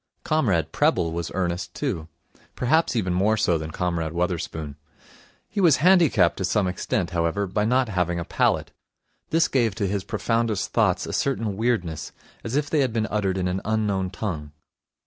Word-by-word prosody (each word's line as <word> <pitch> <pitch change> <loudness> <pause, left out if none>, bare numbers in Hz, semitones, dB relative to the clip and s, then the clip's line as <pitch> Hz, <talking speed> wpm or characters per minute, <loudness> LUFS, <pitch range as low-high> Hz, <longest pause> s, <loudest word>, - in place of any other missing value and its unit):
Comrade 115 - +1
Prebble 85 - +2
was 85 0 -3
earnest, 90 -2 -2
too. 80 -1 -3 0.5
Perhaps 155 +4 +2
even 95 -6 0
more 105 +5 +2
so 85 -5 +2
than 80 0 -5
Comrade 85 -1 -2
Wotherspoon. 85 -4 -3 0.7
He 205 - -2
was 165 -7 +6
handicapped 160 - +4
to 95 - -3
some 95 +1 +1
extent, 90 0 -2
however, 85 +4 0
by 105 +3 -1
not 125 +2 +2
having 90 -4 -1
a 85 - -4
palate. - - +1 0.6
This 165 +1 +3
gave 115 -6 +1
to 105 -3 -1
his 100 0 -1
profoundest 115 -2 -1
thoughts - - +2
a - - -6
certain 115 -7 -1
weirdness, 95 -9 -1 0.3
as 115 +3 -4
if 145 0 +1
they 150 - +1
had 130 -5 +1
been 110 -1 0
uttered 100 -3 0
in 90 -1 0
an 90 +1 -2
unknown 105 -4 0
tongue. 85 -7 -5
95 Hz, 170 wpm, -24 LUFS, 85-115 Hz, 0.7 s, was